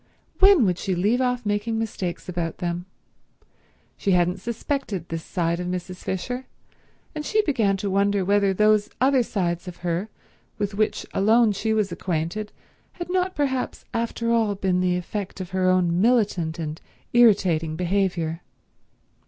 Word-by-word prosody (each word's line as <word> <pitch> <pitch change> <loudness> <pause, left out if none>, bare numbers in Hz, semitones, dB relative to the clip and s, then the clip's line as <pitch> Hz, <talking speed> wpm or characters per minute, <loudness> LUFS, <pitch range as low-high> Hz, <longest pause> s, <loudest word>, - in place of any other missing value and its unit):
When 385 - +7
would 180 -2 0
she 190 - -1
leave 210 +8 +2
off 250 -2 0
making 205 +2 -1
mistakes 200 -6 -4
about 170 -2 -3
them? 175 0 -3 1.1
She 195 - +1
hadn't 180 +1 +2
suspected 230 - -3
this 165 -1 -4
side 170 -1 -1
of 180 - -3
Mrs. 180 0 -4
Fisher, 245 +9 -4 0.7
and 305 -1 -4
she 430 +6 +2
began 225 - +1
to 200 +1 -3
wonder 200 0 +2
whether 200 0 +3
those 210 +1 +3
other 265 0 +4
sides 175 -6 -2
of 180 - -7
her 175 +5 -1 0.5
with 205 -1 -2
which 215 +1 0
alone 220 +3 +4
she 215 +2 -1
was 215 -3 +1
acquainted 175 +5 -3 0.4
had 350 0 -6
not 370 0 0
perhaps 265 -3 -2
after 230 0 -1
all 225 -3 +2
been 190 -2 0
the 180 -1 +1
effect 195 +2 -5
of 185 -1 -6
her 185 0 +2
own 180 -1 +2
militant 200 -8 +2
and 155 -1 -5 0.3
irritating 185 -9 +4
behaviour. 175 -2 -1
195 Hz, 150 wpm, -24 LUFS, 180-230 Hz, 1.1 s, When